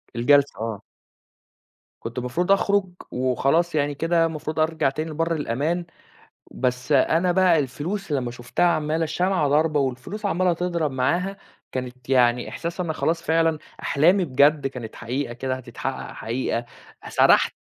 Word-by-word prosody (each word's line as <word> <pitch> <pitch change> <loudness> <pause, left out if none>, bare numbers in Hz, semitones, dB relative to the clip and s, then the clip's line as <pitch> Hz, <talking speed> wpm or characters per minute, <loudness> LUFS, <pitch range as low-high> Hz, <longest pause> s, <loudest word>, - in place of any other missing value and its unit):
الجلسة 140 +3 +3
آه. 110 -3 -4 1.2
كنت 115 +2 -7
المفروض 145 +10 -1
أخرُج، 200 -1 +2 0.2
وخلاص 135 +7 +1
يعني 145 -1 0
كده 165 +2 +2
المفروض 155 -1 -4
أرجع 155 -3 +2
تاني 155 +3 -4
لبر 165 +2 0
الأمان، 155 +6 -1 0.7
بس 125 +2 -2
أنا 165 +6 +3
بقى 180 -3 +4
الفلوس 155 +8 -4
لمّا 130 -4 -1
شُفتها 120 +8 -1
عمّالة 160 -1 +1
الشمعة 175 0 +1
ضاربة 150 +1 +2
والفلوس 135 - -3
عمّالة 185 -2 +2
تضرب 170 -4 -1
معاها، 175 +10 0 0.3
كانت 125 0 -6
يعني 125 -2 +3
إحساسي 170 +2 -4
أنا 160 - -2
خلاص 165 +1 0
فعلًا 165 -1 +2 0.2
أحلامي 175 +6 +3
بجد 140 +1 +3
كانت 125 -4 -8
حقيقة 120 +1 -3
كده 130 +1 -3
هتتحقق 125 -2 -6
حقيقة، 120 0 -2 0.4
سرحت - - +4
150 Hz, 135 wpm, -23 LUFS, 130-170 Hz, 1.2 s, بقى